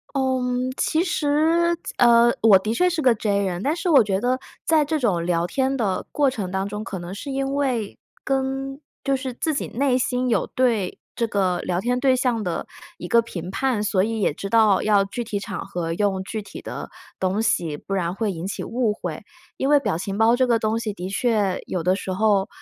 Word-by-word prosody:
嗯， 255 -1 0
其 320 +2 +1
实， 330 +1 +2 0.2
呃， 235 0 +6
我 210 -4 +7
的 215 +3 -2
确 360 +10 +3
是 335 -3 -1
个 250 -3 +5
J 205 -2 0
人。 180 -1 -2
但 295 +7 0
是 350 0 -1
我 275 -7 +7
觉 195 -1 -1
得 250 +2 +1 0.3
在 315 -2 +3
这 315 +1 -1
种 190 - +1
聊 170 -1 +1
天 265 +6 0
的 205 -7 -1
过 285 -2 +3
程 205 -8 -4
当 190 +1 -1
中， 210 +1 -5
可 200 -4 -5
能 175 +2 -7
是 275 +8 -7
因 270 0 -2
为 255 -7 -1 0.3
跟 270 +1 -2 0.2
就 275 - +2
是 260 -2 -3
自 315 +5 -1
己 - - -2
内 255 +1 +1
心 250 0 0
有 - - +1
对 230 -7 0 0.2
这 235 - 0
个 190 -4 0
聊 175 -1 -2
天 245 +4 0
对 260 -1 +3
象 245 -3 0
的 175 -3 -3 0.3
一 175 - -7
个 235 +5 +4
评 180 -6 -6
判， 250 0 0
所 195 -3 +2
以 225 +1 -1
也 190 - +2
知 195 +6 -6
道 215 -3 +4
要 205 -2 +3
具 215 +5 -5
体 210 -3 -3
场 195 - -6
合 175 -4 -3
用 190 +1 0
具 220 +2 -4
体 200 -1 -10
的 - - -6 0.3
东 190 +3 0
西， 165 -8 0
不 195 - -9
然 180 -3 0
会 215 -1 -1
引 170 0 -5
起 195 - -4
误 230 -3 0
会。 - - -6 0.4
因 270 - 0
为 295 0 +6
表 215 - -1
情 195 +2 -4
包 225 +2 +4
这 255 +1 +2
个 235 -2 +3
东 220 +1 0
西 215 -3 -3
的 185 0 -6
确 205 -3 +1
有 180 - -2
的 185 +2 +2
时 190 -1 -4
候， 200 0 +2
225 Hz, 235 characters per minute, -23 LUFS, 195-260 Hz, 0.4 s, 我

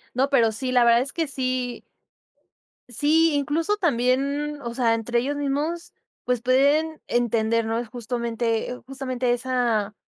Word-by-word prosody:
No, 265 +2 +2
pero 235 -5 +3
sí, 255 +3 -3
la 245 -1 +5
verdad 235 0 +5
es 265 +2 -1
que 330 -1 -1
sí 255 -3 -2 1.0
Sí, 305 +7 +3
incluso 310 +8 0
también, 280 - 0
mm, - - -14
o 235 -1 -5
sea, 235 -3 +2
entre 235 +1 0
ellos 285 +3 -2
mismos, 290 +4 -2 0.3
pues 250 -2 0
pueden 285 +5 +2
entender 230 -1 +1
¿no?, 225 +1 -1
es 240 -1 -4
justamente 235 0 -2
justamente 255 -2 -2
esa 240 -4 0
255 Hz, 150 wpm, -24 LUFS, 235-285 Hz, 1.0 s, la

